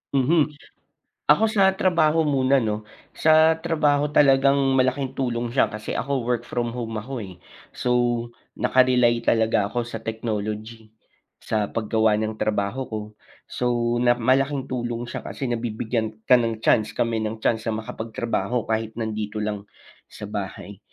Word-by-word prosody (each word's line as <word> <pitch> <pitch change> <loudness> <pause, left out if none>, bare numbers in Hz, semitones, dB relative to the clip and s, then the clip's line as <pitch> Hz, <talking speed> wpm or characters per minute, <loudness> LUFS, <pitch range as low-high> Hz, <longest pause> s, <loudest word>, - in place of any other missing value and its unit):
Mhm. 150 +3 +2 0.7
Ako, 220 0 +4
sa 195 -3 +4
trabaho 165 -4 +2
muna, 135 -3 +2
'no? 105 -1 -3 0.3
Sa 160 0 +5
trabaho, 150 -3 +1
talagang 135 -1 +5 0.2
malaking 130 +1 +1
tulong 120 -2 -1
siya. 130 - +3
Kasi 105 0 -7
ako, 140 -2 -1
work 120 0 -2
from 120 -1 -2
home 115 -1 -5
ako, 135 +3 -6
eh. 95 -5 -7 0.4
So, 125 - -2 0.6
naka-rely 125 -2 +3
talaga 110 -2 +2
ako 120 +4 -2
sa 115 -1 -6
technology 110 0 -5 0.5
sa 105 -2 -1
paggawa 110 0 +1
ng 110 0 -2
trabaho 105 +5 -1
ko. 110 -1 -4 0.5
So, 120 -1 0
na 120 0 +4
malaking 130 +3 +1
tulong 120 -1 -3
siya - - -6
kasi 135 -3 -4
nabibigyan 115 -1 -2 0.2
ka 125 - +8
ng 115 -2 -2
chance, 110 -1 +2
kami 115 -1 0
ng 110 +1 -6
chance 110 0 0
sa 110 - 0
makapagtrabaho 110 0 -3
kahit 110 0 -1
nandito 110 -2 -3
lang 105 -1 -4 0.4
sa 105 - -10
bahay. 100 -1 -6
120 Hz, 145 wpm, -23 LUFS, 110-130 Hz, 0.7 s, ka